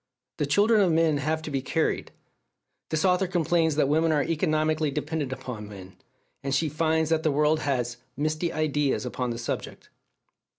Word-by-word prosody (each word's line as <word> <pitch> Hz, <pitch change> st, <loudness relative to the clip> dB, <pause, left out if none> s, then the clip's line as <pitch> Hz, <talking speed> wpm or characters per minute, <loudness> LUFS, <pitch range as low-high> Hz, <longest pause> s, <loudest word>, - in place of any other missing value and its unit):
The 145 Hz, -, -1 dB
children 205 Hz, +8 st, +4 dB
of 185 Hz, -3 st, +3 dB
men 160 Hz, -2 st, +3 dB
have 155 Hz, +3 st, -1 dB
to 155 Hz, -, -5 dB
be 135 Hz, -1 st, -1 dB
carried. 160 Hz, +5 st, -1 dB, 0.8 s
This 160 Hz, +2 st, 0 dB
author 185 Hz, 0 st, +3 dB
complains 170 Hz, -3 st, +1 dB
that 145 Hz, -2 st, +2 dB
women 160 Hz, +3 st, +2 dB
are 150 Hz, -2 st, +2 dB
economically 155 Hz, 0 st, +1 dB
dependent 150 Hz, -1 st, -3 dB
upon 115 Hz, -5 st, -6 dB
men; 95 Hz, -2 st, -11 dB, 0.5 s
and 135 Hz, 0 st, -1 dB
she 155 Hz, +2 st, +1 dB
finds 160 Hz, +1 st, +1 dB
that 160 Hz, -1 st, +2 dB
the 155 Hz, -2 st, +1 dB
world 150 Hz, +2 st, +2 dB
has 125 Hz, -5 st, -1 dB, 0.2 s
"misty 155 Hz, +3 st, -1 dB
ideas 150 Hz, -4 st, 0 dB
upon 125 Hz, 0 st, -3 dB
the 115 Hz, -, -3 dB
subject." 120 Hz, -, -5 dB
155 Hz, 170 wpm, -26 LUFS, 140-160 Hz, 0.8 s, children